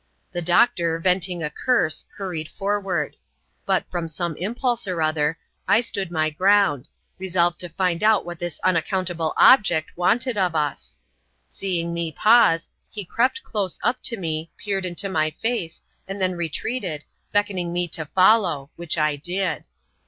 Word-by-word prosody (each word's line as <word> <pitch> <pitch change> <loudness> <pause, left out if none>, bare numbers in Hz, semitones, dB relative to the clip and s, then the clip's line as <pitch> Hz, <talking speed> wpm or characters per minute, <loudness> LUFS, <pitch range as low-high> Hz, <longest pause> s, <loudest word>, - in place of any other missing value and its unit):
The 175 -2 -3
doctor, 170 -1 +3
venting 180 0 +1
a 150 - -2
curse, 175 -4 +1
hurried 175 -6 -4
forward; 200 -1 -2 0.5
but, - - +2
from 175 -2 -3
some 165 +1 -3
impulse 235 +4 -1
or 180 -3 -2
other, 155 0 +1 0.3
I 220 - +5
stood 195 -6 -3
my 155 -2 0
ground, 185 -5 +3 0.3
resolved 175 -2 +1
to 175 - -5
find 180 +1 -1
out 215 -1 +4
what 175 -1 -7
this 175 -2 -5
unaccountable 175 -2 0
object 175 -11 +5
wanted 225 +6 +1
of 180 -3 +1
us. 145 -2 -2 0.5
Seeing 170 - -2
me 170 -1 -2
pause, 210 -2 +4 0.2
he 205 -3 -6
crept 255 - 0
close 195 -5 -2
up 250 +1 +1
to 230 - +1
me, 160 -3 -4
peered 195 -3 -2
into 180 +3 -2
my 155 -5 +1
face, 225 -8 -3 0.2
and 195 +1 -6
then 185 -1 +1
retreated, 170 0 -3 0.3
beckoning 200 -4 0
me 175 0 0
to 160 0 -2
follow, 185 -7 +3
which 170 -1 -2
I 150 -2 +1
did. 175 +2 -2
175 Hz, 150 wpm, -23 LUFS, 165-200 Hz, 0.5 s, I